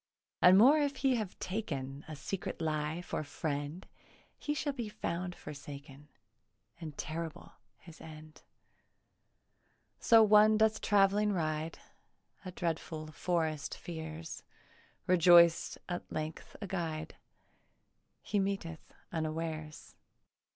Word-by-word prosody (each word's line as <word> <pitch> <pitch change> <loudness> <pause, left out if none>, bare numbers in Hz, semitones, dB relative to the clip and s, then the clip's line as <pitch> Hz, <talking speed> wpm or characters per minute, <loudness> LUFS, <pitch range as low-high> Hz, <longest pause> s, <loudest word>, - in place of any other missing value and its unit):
And 185 +1 +8
more 270 +9 +7
if 285 -1 0
he 260 -1 +2
have 210 -5 -4
taken 145 -9 -4
A 155 - -6
secret 180 +6 -5
lie 155 +1 -2
for 155 - -3
friend, 145 +3 -4 0.5
He 295 - -2
shall 290 -1 -1
be 240 -5 -4
found 180 -3 -4
forsaken, 145 0 -10 0.7
And 155 -4 -8
terrible 160 0 -5 0.3
his 165 -2 -15
end. 155 -1 -12 1.6
So 225 -2 +7
one 215 0 +6
doth 220 0 +3
travelling 205 0 +3
ride; 155 -2 -2 0.7
A 185 - -6
dreadful 160 -3 -4
forest 160 -2 -1
fears; 160 -1 -7 0.6
Rejoiced 170 -1 +6
at 175 -1 -5
length 155 0 -5
a 205 - -5
guide 165 -5 -4 1.1
He 205 - 0
meeteth 195 -5 -3 0.2
unawares. 155 -1 -4
165 Hz, 110 wpm, -32 LUFS, 155-195 Hz, 1.6 s, And